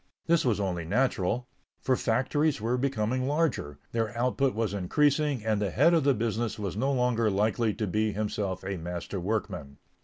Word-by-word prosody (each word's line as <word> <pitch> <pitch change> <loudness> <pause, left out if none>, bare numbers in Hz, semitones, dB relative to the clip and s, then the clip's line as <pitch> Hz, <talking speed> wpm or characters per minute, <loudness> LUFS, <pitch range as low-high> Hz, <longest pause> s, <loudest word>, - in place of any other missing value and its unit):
This 170 -1 +3
was 115 -5 +1
only 90 -4 -1
natural, 115 +3 0 0.3
for 130 - +1
factories 135 +6 +1
were 115 +3 0
becoming 130 -1 0
larger, 145 - 0
their 115 -1 -2
output 125 +1 +1
was 110 -3 -1
increasing 140 - +1
and 110 -2 +1
the 100 - 0
head 170 - +4
of 160 -4 +3
the 140 -2 +4
business 115 +1 -1
was 100 -4 -4
no 135 +6 +1
longer 125 -4 +2
likely 110 +2 +1
to 110 - -2
be 105 +3 0
himself 100 -3 -2
a 95 0 -3
master 90 +3 -5
workman. 85 -8 -3
110 Hz, 175 wpm, -28 LUFS, 100-130 Hz, 0.3 s, head